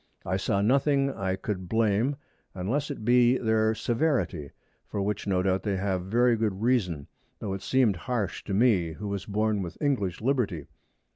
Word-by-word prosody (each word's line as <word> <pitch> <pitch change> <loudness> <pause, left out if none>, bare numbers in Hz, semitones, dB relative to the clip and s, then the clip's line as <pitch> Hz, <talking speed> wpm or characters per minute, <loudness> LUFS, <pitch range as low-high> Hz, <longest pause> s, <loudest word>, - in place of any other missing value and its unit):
I 95 - 0
saw 100 +1 0
nothing 140 +3 +2
I 95 -1 -2
could 95 -2 -5
blame, 115 +4 +2 0.4
unless 125 +11 -1
it 135 -7 -6
be 125 +1 +5
their 110 -2 +1
Severity, 115 - 0 0.4
for - - -4
which 100 +1 -2
no 90 -2 +1
doubt 95 0 +1
they 100 -3 -1
have 95 -1 -1
very 120 +4 +3
good 105 -2 -2
reason, 90 - +1 0.3
tho' 100 -3 -4
it 95 - -5
seemed 125 -8 +2
harsh 115 -2 -3
to 100 - -2
me, 100 -8 +3
who 105 +6 -6
was 100 -1 -4
born 105 0 0
with 90 -1 -7
English 125 - 0
Liberty. 110 - 0
105 Hz, 170 wpm, -27 LUFS, 95-120 Hz, 0.4 s, be